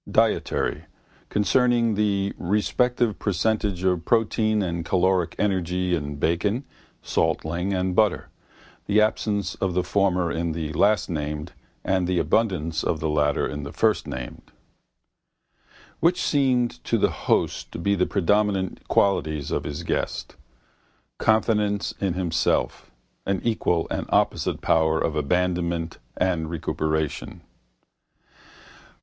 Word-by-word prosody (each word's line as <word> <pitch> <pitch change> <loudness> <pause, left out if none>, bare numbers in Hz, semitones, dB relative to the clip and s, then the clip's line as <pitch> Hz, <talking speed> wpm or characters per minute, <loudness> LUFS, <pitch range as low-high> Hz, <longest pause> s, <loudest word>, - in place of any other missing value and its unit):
Dietary: 75 +3 +1 0.4
concerning 115 +2 +2
the 100 -1 0
respective 110 +4 +1
percentage 100 -1 0
of 90 -3 +1
protein 110 -1 +2
and 85 -2 -2
caloric 90 -1 +1
energy 90 -2 0
in 75 -3 -2
bacon, 90 - 0 0.4
salt 80 -1 0
ling 85 +4 -2
and 90 -1 -1
butter, 105 0 +2 0.6
the 105 +1 +4
absence 105 -1 0
of 95 -2 -2
the 90 - +2
former 90 -2 +1
in 85 0 -2
the 80 -2 -4
lastnamed 75 -5 0 0.3
and 95 -2 +1
the 90 -1 0
abundance 85 -7 0
of 80 - 0
the 80 - -1
latter 75 -1 +1
in 75 - -5
the 70 0 -7
firstnamed. 65 - -1 1.6
Which 175 +2 +3
seemed 130 -4 +1
to - - +1
the - - +2
host - - -1
to - - -6
be 100 +4 +1
the 90 -2 +1
predominant 100 0 0
qualities 75 -7 +1
of - - -1
his 75 +3 -5
guest? - - -3 0.8
Confidence 105 -2 +1
in 95 -3 0
himself, 85 -3 0 0.4
an 100 -1 +1
equal 90 -7 +1
and - - -2
opposite - - +1
power 80 0 +2
of 80 -1 -1
abandonment 85 +1 -1 0.2
and 85 -4 0
recuperation. 80 -2 -2
90 Hz, 120 wpm, -24 LUFS, 80-105 Hz, 1.6 s, the